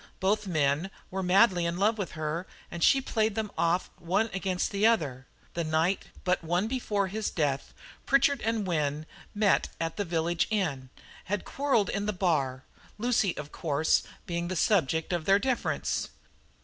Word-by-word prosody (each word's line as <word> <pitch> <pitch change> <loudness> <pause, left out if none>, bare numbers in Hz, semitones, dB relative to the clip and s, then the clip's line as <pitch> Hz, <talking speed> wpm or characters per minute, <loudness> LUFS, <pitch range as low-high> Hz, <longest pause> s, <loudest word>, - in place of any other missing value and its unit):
Both 205 +2 +1
men 155 +1 +1 0.2
were 190 +1 -2
madly 185 -1 +4
in 170 +1 -2
love 215 +3 +2
with 195 - -3
her, 155 +3 -3 0.2
and 170 -1 -3
she 270 - +5
played 220 -4 0
them 220 -2 -2
off 170 +2 +1
one 195 +6 0
against 190 -1 -1
the 205 +2 +3
other. 140 - 0 0.3
The 170 - -1
night 160 +4 +1 0.2
but 180 -2 +1
one 175 +5 0
before 220 -5 0
his 210 +3 -2
death 140 -4 -1 0.4
Pritchard 275 +1 +3
and 225 -2 0
Wynne 150 -4 0
had - - -12 0.3
met 205 -1 +3
at 165 +2 -3
the 205 - 0
village 170 -1 0
inn, 155 - -1 0.4
had 200 0 -2
quarrelled 275 -7 +1
in 205 +1 -2
the 210 - 0
bar 145 -9 0 0.3
Lucy, 220 -5 +1
of 150 0 -6
course, 155 0 +1 0.2
being 170 0 -2
the 185 - -3
subject 160 -3 +1
of 170 -3 -1
their 195 0 +5
difference. 250 +4 -1
185 Hz, 170 wpm, -29 LUFS, 160-210 Hz, 0.4 s, she